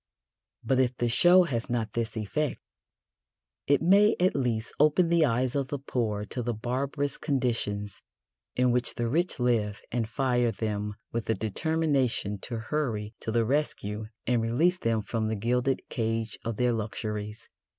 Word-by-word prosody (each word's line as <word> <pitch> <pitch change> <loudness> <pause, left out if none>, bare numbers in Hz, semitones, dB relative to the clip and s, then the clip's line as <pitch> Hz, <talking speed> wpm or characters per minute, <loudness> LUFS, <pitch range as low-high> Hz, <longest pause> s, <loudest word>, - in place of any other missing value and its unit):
But 130 -1 +2
if 130 -1 +1
the 120 - +1
show 175 +10 +6
has 125 -8 -3
not 115 -3 -1
this 115 -1 -2
effect, 135 +8 -2 1.1
it 145 +2 +3
may 200 +5 +5
at 185 +1 +3
least 120 -4 -1
open 155 +4 +4
the 170 -1 +4
eyes 125 -1 +1
of 140 -2 0
the 145 - -3
poor 110 -6 -2
to 125 - -4
the 120 -1 -2
barbarous 140 +5 -2
conditions 115 - -1 0.5
in 125 0 +3
which 125 0 +1
the 120 -1 -1
rich 165 +5 0
live 110 -5 +1
and 115 -2 -1
fire 125 -2 +1
them 105 -1 -3 0.2
with 115 -1 -2
the 110 - +1
determination 130 - 0
to 115 +4 -4
hurry 115 -8 -1
to 110 - -4
the 115 0 +2
rescue 110 -6 -1 0.2
and 120 -1 +2
release 160 +11 +2
them 115 -5 0
from 110 +1 -2
the 110 - -1
gilded 125 +5 0
cage 115 -1 -2
of 115 -2 -3
their 125 -1 +2
luxuries. 105 0 -4
120 Hz, 160 wpm, -28 LUFS, 110-140 Hz, 1.1 s, show